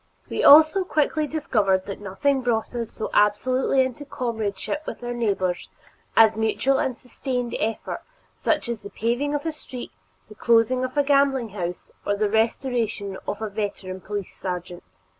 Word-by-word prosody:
We -, -, -1 dB
also 315 Hz, +6 st, +8 dB
quickly 305 Hz, -2 st, +1 dB
discovered 210 Hz, -11 st, +1 dB
that 200 Hz, 0 st, -6 dB
nothing 265 Hz, +8 st, 0 dB
brought 235 Hz, -2 st, -1 dB
us 235 Hz, -2 st, -3 dB
so 220 Hz, -, -5 dB
absolutely 255 Hz, +6 st, +3 dB
into 260 Hz, +2 st, -4 dB
comradeship 230 Hz, -2 st, -3 dB
with -, -, -6 dB
our 240 Hz, 0 st, -3 dB
neighbors 195 Hz, -6 st, -1 dB, 0.5 s
as 220 Hz, -1 st, +7 dB
mutual 225 Hz, +5 st, +1 dB
and 255 Hz, -2 st, -1 dB
sustained 250 Hz, -1 st, -4 dB
effort 220 Hz, 0 st, -2 dB, 0.3 s
such -, -, 0 dB
as 235 Hz, -2 st, -3 dB
the 200 Hz, -, -8 dB
paving 245 Hz, +8 st, -1 dB
of 290 Hz, -, -3 dB
a 325 Hz, -, 0 dB
street, 260 Hz, -5 st, -8 dB, 0.4 s
the -, -, -12 dB
closing 235 Hz, +3 st, +3 dB
of 255 Hz, +3 st, -4 dB
a 285 Hz, -, +5 dB
gambling 275 Hz, -4 st, +3 dB
house, 180 Hz, -3 st, -5 dB
or 205 Hz, -, 0 dB
the 205 Hz, 0 st, 0 dB
restoration 225 Hz, -3 st, 0 dB
of 210 Hz, -, -3 dB
a -, -, -1 dB
veteran 195 Hz, -3 st, -4 dB
police 205 Hz, -1 st, -5 dB
sergeant. 180 Hz, -1 st, -5 dB
230 Hz, 160 wpm, -24 LUFS, 205-265 Hz, 0.5 s, also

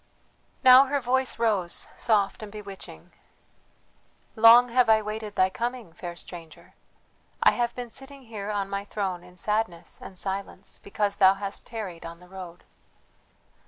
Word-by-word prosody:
Now 255 Hz, +1 st, +9 dB
her 285 Hz, +1 st, 0 dB
voice 260 Hz, +1 st, 0 dB
rose 205 Hz, -7 st, 0 dB
soft 210 Hz, -3 st, +1 dB
and 210 Hz, -1 st, -8 dB
bewitching: 195 Hz, -, -10 dB, 1.2 s
"Long 230 Hz, +2 st, +8 dB
have 245 Hz, -1 st, +3 dB
I 220 Hz, 0 st, +6 dB
waited 215 Hz, 0 st, -5 dB
thy 185 Hz, 0 st, +3 dB
coming, 235 Hz, -4 st, -4 dB
fair 175 Hz, 0 st, -7 dB
stranger. 170 Hz, -2 st, -10 dB, 0.7 s
I -, -, +7 dB
have 240 Hz, -1 st, -1 dB
been 245 Hz, -2 st, -6 dB
sitting 270 Hz, +2 st, -9 dB
here 215 Hz, -4 st, -7 dB
on 200 Hz, -2 st, -1 dB
my 200 Hz, 0 st, -3 dB
throne 195 Hz, -4 st, -4 dB
in 180 Hz, 0 st, -17 dB
sadness 195 Hz, -4 st, -2 dB
and 185 Hz, -, -10 dB
silence, 195 Hz, +1 st, -5 dB
because 200 Hz, 0 st, -2 dB
thou 190 Hz, -1 st, +6 dB
hast 200 Hz, 0 st, -6 dB
tarried 205 Hz, -7 st, -6 dB
on 170 Hz, 0 st, -9 dB
the 180 Hz, -, -16 dB
road. 180 Hz, -2 st, -10 dB
205 Hz, 150 wpm, -26 LUFS, 185-230 Hz, 1.2 s, Now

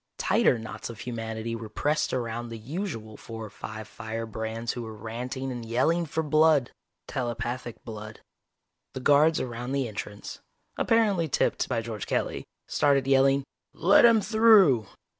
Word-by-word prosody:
Tighter -, -, +3 dB
knots 110 Hz, 0 st, -7 dB
of 115 Hz, -, -9 dB
humanity 115 Hz, -1 st, -4 dB
were 110 Hz, -1 st, -7 dB
pressed 150 Hz, +8 st, 0 dB
around 120 Hz, -1 st, -3 dB
the 115 Hz, -, -6 dB
usual 115 Hz, -, -5 dB
four 115 Hz, -1 st, -8 dB
or 105 Hz, -, -11 dB
five 110 Hz, -1 st, -8 dB
firebrands 110 Hz, 0 st, -4 dB
who 120 Hz, -, -5 dB
were 110 Hz, -1 st, -7 dB
ranting 125 Hz, +5 st, -5 dB
and 120 Hz, -2 st, -5 dB
yelling 155 Hz, +9 st, +1 dB
for 160 Hz, +2 st, -1 dB
blood 155 Hz, -3 st, +3 dB, 0.4 s
telepathic 120 Hz, -2 st, -3 dB
blood. 110 Hz, -1 st, -8 dB, 0.8 s
The -, -, -3 dB
guards 145 Hz, +4 st, +4 dB
around 120 Hz, +1 st, -4 dB
the 135 Hz, -3 st, 0 dB
entrance, 105 Hz, -1 st, -7 dB, 0.4 s
apparently 210 Hz, -7 st, +2 dB
tipped 140 Hz, -, 0 dB
by 115 Hz, -2 st, -1 dB
George 110 Hz, -3 st, -5 dB
Kelly, -, -, -1 dB, 0.2 s
started 140 Hz, -2 st, +2 dB
yelling, 135 Hz, 0 st, +4 dB, 0.3 s
"Let 195 Hz, +4 st, +5 dB
him 230 Hz, -2 st, +6 dB
through!" 205 Hz, -, +5 dB
120 Hz, 145 wpm, -27 LUFS, 110-145 Hz, 0.8 s, him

